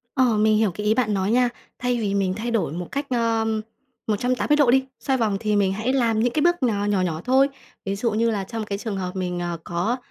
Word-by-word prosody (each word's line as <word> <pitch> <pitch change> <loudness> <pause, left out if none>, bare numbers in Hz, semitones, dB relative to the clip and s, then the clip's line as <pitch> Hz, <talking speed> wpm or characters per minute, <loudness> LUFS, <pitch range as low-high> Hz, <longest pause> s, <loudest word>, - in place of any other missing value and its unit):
Ờ, 255 -5 +3
mình 215 0 +4
hiểu 215 -2 +2
cái 210 +4 -5
ý 215 - +4
bạn 225 -4 +1
nói 195 +1 0
nha. 245 +1 +4 0.3
Thay 245 -1 0
vì 200 -2 -1
mình 190 -2 +1
thay 225 +4 -3
đổi 225 -11 0
một 175 +1 -5
cách, 280 0 -2
ờm, 225 -2 +1 0.5
180 250 +7 +1
độ 290 -5 +4
đi, 265 +1 +4 0.2
xoay 270 -2 +1
vòng, 215 -4 +1
thì 210 -1 +1
mình 195 -2 +2
hãy 220 +6 -1
làm 230 -5 +2
những 240 +1 +1
cái 300 - +1
bước 345 -1 +2
nò 210 -5 +1
nhỏ 205 -2 +1
nhỏ 165 -3 -2
thôi, 265 +2 +4 0.4
ví 195 0 -2
dụ 230 +3 0
như 225 +2 +1
là 205 -3 -2
trong 225 +2 -5
cái 200 -1 -4
trường 215 -2 -4
hợp 185 0 -4
mình, 180 -1 -2
ờ, 175 -1 -3
có 180 +8 -1
220 Hz, 255 wpm, -23 LUFS, 200-245 Hz, 0.5 s, mình